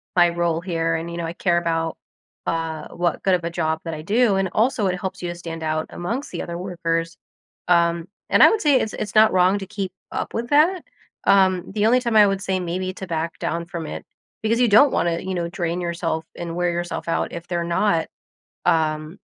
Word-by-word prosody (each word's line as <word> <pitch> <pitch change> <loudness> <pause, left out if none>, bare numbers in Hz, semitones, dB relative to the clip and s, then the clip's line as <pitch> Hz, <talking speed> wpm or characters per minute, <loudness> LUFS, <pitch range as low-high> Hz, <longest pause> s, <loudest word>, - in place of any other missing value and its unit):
my 175 -1 +6
role 170 -1 0
here, 165 -2 -1
and, 165 +1 -4
you 170 - -6
know, 170 - -3
I 165 - -4
care 175 -1 +1
about, 165 -1 -1 0.5
uh, 165 -1 -2
what 175 -1 -2
good 190 -1 +4
of 175 - -3
a 170 - -1
job 160 -1 -1
that 165 -1 -4
I 155 - -6
do." 210 +5 +2
And, 190 -1 0
also, 220 -2 +2
it 180 0 -1
helps 190 0 -5
you 175 - -3
to 175 - -5
stand 165 -1 -7
out 155 0 -1
amongst 230 +11 -4
the - - -4
other 170 0 -5
workers. 165 -2 -2 0.5
Um, 170 -1 +2 0.2
and - - +4
I - - +10
would 445 - 0
say 285 -4 +4
it's 215 - -2
it's 205 - -5
not 215 0 +6
wrong 185 +2 +4
to 195 - -6
keep 195 -2 -4 0.2
up - - -4
with 235 +1 -3
that. 330 +5 +4 0.4
Um, 185 -2 +3
the 210 +1 0
only 245 +3 +5
time 235 -3 -1
I 210 -1 +8
would 195 0 -1
say 190 -1 -1
maybe 185 +1 -3
to 190 - -7
back 165 -1 -3
down 170 0 -2
from 170 -1 -6
it - - -7 0.4
because 230 +2 +1
you 245 - +5
don't 255 +6 +6
wanna, 170 -1 +1
you 190 0 -4
know, 170 -1 -2
drain 175 -1 -2
yourself 170 -2 -2
and 170 -1 -5
wear 175 0 +1
yourself 175 0 -4
out 165 - -1
if 170 0 -7
they're 175 -1 -1
not, 170 0 +1 0.6
um, 155 +2 +1
175 Hz, 225 wpm, -22 LUFS, 165-195 Hz, 0.6 s, I